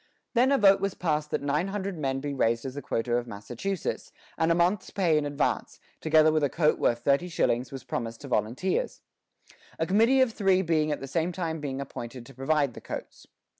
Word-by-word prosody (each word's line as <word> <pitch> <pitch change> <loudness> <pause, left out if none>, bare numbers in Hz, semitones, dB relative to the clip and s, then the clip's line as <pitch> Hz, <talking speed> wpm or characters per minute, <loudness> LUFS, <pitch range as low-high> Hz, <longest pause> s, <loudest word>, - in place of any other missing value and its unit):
Then 255 +2 +4
a 275 - +4
vote 195 -4 +5
was 195 -1 -1
passed 155 -3 -1
that - - -2
nine 150 +6 0
hundred 195 -1 -3
men 135 -4 -2
be 145 0 -3
raised 115 -3 +1
as 130 - -4
the 145 - -6
quota 120 -1 -1
of 120 0 -3
Massachusetts, 120 - -4 0.2
and 160 +1 +2
a - - +4
month's 180 +3 +1
pay 175 -5 +2
in 150 -1 +1
advance, 145 0 -1 0.2
together 155 0 +4
with 155 -1 +1
a 145 - +3
coat 155 0 +2
worth 120 0 +1
thirty 140 +6 +2
shillings, 125 -6 0
was 135 -3 -7
promised 115 -1 -4
to 145 - -8
volunteers; 135 - -1 0.8
a 160 - 0
committee 225 +9 +4
of 250 -4 +2
three 190 -3 +2
being 155 -3 +1
at 150 - -3
the 135 - -5
same 165 +5 0
time 165 -3 -3 0.2
appointed 120 -2 -7
to 135 - -13
provide 140 0 +1
the - - -10
coats. - - -8
155 Hz, 205 wpm, -27 LUFS, 135-185 Hz, 0.8 s, vote